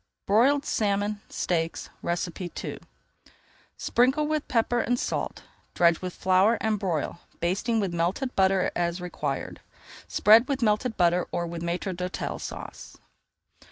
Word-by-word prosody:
BROILED 270 +8 +4
SALMON 205 0 0
STEAKS 165 -2 -2
II 175 0 -4 1.0
Sprinkle 265 +5 +2
with 305 0 -1
pepper 240 0 +1
and 245 +1 +1
salt, - - -3 0.3
dredge 170 -1 +4
with 180 -1 -4
flour, 190 +5 +3
and 215 -2 0
broil, 170 -3 -2 0.2
basting 205 +7 0
with 195 -4 -1
melted 180 +10 -1
butter 190 -1 +3
as 170 +1 -1
required. 155 -6 -4 0.5
Spread 225 +4 +6
with 275 -3 -1
melted 220 +2 +1
butter, 175 0 +3
or 175 - -1
with 170 0 -6
Maître 175 +2 -2
d'Hôtel 180 +1 -4
Sauce. - - -8
190 Hz, 125 wpm, -27 LUFS, 175-230 Hz, 1.0 s, Spread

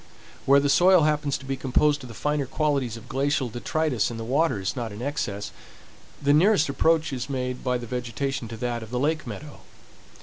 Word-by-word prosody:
Where 140 +1 +7
the 140 - +1
soil 180 +3 +5
happens 150 -2 +1
to 135 - -12
be 135 0 -2
composed 145 +3 +1
of - - -8
the 115 - -10
finer 150 0 -1
qualities 135 -5 0
of 115 +1 -12
glacial 135 0 0
detritus 125 0 -1
and 115 -1 -6
the - - -4
water 135 0 +1
is 95 +6 -3
not 120 -4 -4
in 105 - -8
excess, 110 -6 -3 0.7
the 145 0 +3
nearest 165 -1 +4
approach 160 +1 +2
is 125 +1 -4
made 125 -2 -3
by 125 -1 +1
the 120 - -7
vegetation 125 +1 -3
to 115 +1 -7
that 120 0 -2
of 110 - -9
the 125 - -3
lake 155 +3 0
meadow. 150 -1 -8
135 Hz, 205 wpm, -25 LUFS, 120-150 Hz, 0.7 s, Where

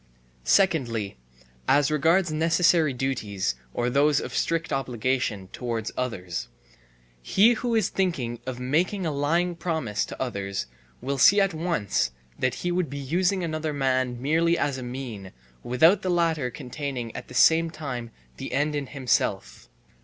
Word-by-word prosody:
Secondly, 120 - +2 0.5
as 145 +1 +4
regards 165 +4 +3
necessary 165 0 +3
duties, 115 - -2 0.2
or 120 - -1
those 140 +3 +3
of - - -6
strict 165 -1 -1
obligation, 125 -6 -1
towards 115 -2 -4
others: 90 -9 -3 0.7
He 205 - +4
who 235 0 -1
is 220 - +2
thinking 135 -12 -1
of 130 -1 -4
making 170 +9 0
a 160 - 0
lying 165 +5 +1
promise 160 - -2
to - - -9
others 100 -6 -3 0.4
will 135 +2 -2
see 200 +10 +7
at 195 -2 +2
once 155 - -1 0.3
that 130 -1 +1
he 175 - +1
would 175 -3 0
be 140 - -6
using 175 +7 0
another 155 -2 -2
man 130 -3 0
merely 165 +5 +2
as 140 -2 -1
a - - -6
mean, 120 -6 -7 0.3
without 160 +11 +4
the 185 - -2
latter 165 -6 +1
containing 125 -2 -5
at - - -7
the 125 - -11
same 165 +5 +5
time 135 -7 -5 0.3
the - - -6
end 145 +3 +1
in 145 -2 -2
himself. 130 -3 -1
140 Hz, 150 wpm, -26 LUFS, 125-165 Hz, 0.7 s, see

